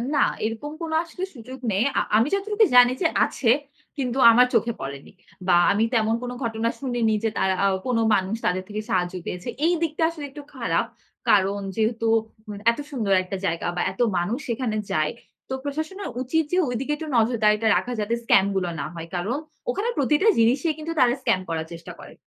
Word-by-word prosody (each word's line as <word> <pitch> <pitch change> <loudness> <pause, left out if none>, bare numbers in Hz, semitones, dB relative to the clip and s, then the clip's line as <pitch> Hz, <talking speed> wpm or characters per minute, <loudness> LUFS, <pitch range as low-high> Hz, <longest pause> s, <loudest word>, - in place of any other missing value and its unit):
না, 285 - +4 0.2
এরকম 225 +7 -4
কোনো 325 -1 -3
আসলে 345 +2 -8
সুযোগ 255 +2 -9
নেই। 195 +3 +2
অ্যা - - +2 0.2
আমি 225 +4 +3
যতটুকু 420 +2 +2
জানি 245 0 +8
যে 340 - +4 0.2
আছে, 235 - -1 0.5
কিন্তু 255 -2 -2
আমার 245 +2 +6
চোখে 235 0 +2
পড়েনি। 140 +1 -7 0.4
বা 175 - +5 0.2
আমি 205 +2 +2
তেমন 225 -1 +2
কোন 245 - -4
ঘটনা 225 0 -1
শুনিনি 245 -5 0
যে, 225 - +2
তারা 190 -1 +2
অ্যা 200 - +4 0.2
কোন 245 -2 +1 0.2
মানুষ 195 +2 -1
তাদের 185 +1 0
থেকে 210 0 -4
সাহায্য 180 -3 0
পেয়েছে। 180 +5 -5 0.2
এই 345 - +4
দিকটা 320 0 -1
আসলে 320 -3 -7
একটু 295 - -9
খারাপ। - - 0 0.4
কারণ 200 0 +3 0.2
যেহেতু 225 +1 0 0.6
এত 235 - -7
সুন্দর 220 -8 0
একটা 190 +1 -5
জায়গা 165 -2 -1
বা 175 - -1
এত 190 - -15 0.2
মানুষ 190 +8 -1
সেখানে 230 -2 -1
যায়। 155 -1 +1 0.4
তো - - -3
প্রশাসনের 315 +7 -4
উচিত 320 +6 +1
যে, 360 - +2
ঐদিকে 250 +4 -3
একটু 315 +1 -7
নজরদারিটা 220 -1 +3
রাখা 245 - -3
যাতে 210 +2 -1
স্কাম 195 -4 +5
গুলো 185 -2 0
না 140 - -2
হয়। 165 -1 -7
কারণ 200 +9 -1 0.3
ওখানে 460 0 -1
প্রতিটা 300 - +2
জিনিসই 260 +8 +3
কিন্তু 320 +1 -4
তারা 245 -1 +5
স্কাম 190 - +2
করার 160 -1 -2
চেষ্টা 165 0 -9
করে। - - -12
230 Hz, 190 wpm, -24 LUFS, 195-280 Hz, 0.6 s, জানি